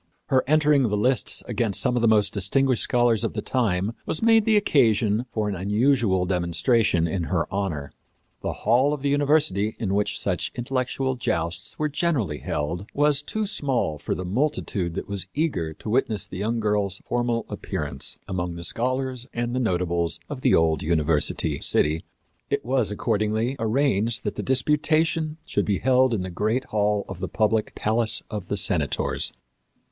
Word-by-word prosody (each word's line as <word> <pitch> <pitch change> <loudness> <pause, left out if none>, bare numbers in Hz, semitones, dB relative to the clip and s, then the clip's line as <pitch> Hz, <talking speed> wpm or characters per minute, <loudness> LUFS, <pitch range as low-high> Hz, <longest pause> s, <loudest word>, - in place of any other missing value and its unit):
Her 130 -1 +3
entering 150 -1 +4
the 105 -5 +1
lists 125 +5 +1
against 115 -3 0
some 125 -2 +2
of 120 - +1
the 115 - +3
most 105 -2 +3
distinguished 125 +6 +2
scholars 120 -4 +2
of - - -2
the 105 - -3
time 105 -4 0
was 160 - -2
made 225 -2 +5
the 220 -1 +4
occasion 115 - +2
for 110 -2 -2
an 105 - -2
unusual 105 0 +1
demonstration 90 +1 +1
in 85 +1 -2
her 85 0 0
honor. 85 -8 -3 0.5
The - - -2
hall 125 +7 +4
of 140 - -11
the 140 - +1
university 145 -8 +2
in 100 -5 -2
which 105 +1 0
such - - -2
intellectual 130 +1 -2
jousts 85 -7 -3
were 155 - 0
generally 145 - -1
held 85 +7 -3
was 145 -1 +3
too 215 +8 -3
small 130 - -1
for - - -3
the 90 - -5
multitude 95 - -1
that - - -4
was 100 -2 -4
eager 140 - -1
to 105 - -8
witness 110 -5 0
the 95 - -8
young 115 +3 -1
girl's 105 -3 0
formal 120 -1 -1
appearance 70 -2 -3
among 90 -2 -3
the 85 - -7
scholars 130 +3 -2
and 120 0 -2
the 130 - 0
notables 85 -6 -1
of 130 - -6
the - - +4
old 80 -2 +2
university 80 -2 +1
city. 80 +2 +1 0.5
It - - -1
was, 125 -4 +1
accordingly, 110 +4 -1
arranged 115 -1 +1
that - - -2
the - - -4
disputation 155 +4 +1
should 100 - -1
be 100 -2 +1
held 130 +2 +3
in 105 -5 -1
the 95 - -5
great 110 +8 0
hall 105 -3 0
of 95 -3 -8
the 95 - -4
public 110 0 0
Palace 110 +1 +3
of 105 -4 -5
the 100 - -2
Senators. 80 -7 +2
110 Hz, 175 wpm, -24 LUFS, 95-130 Hz, 0.5 s, made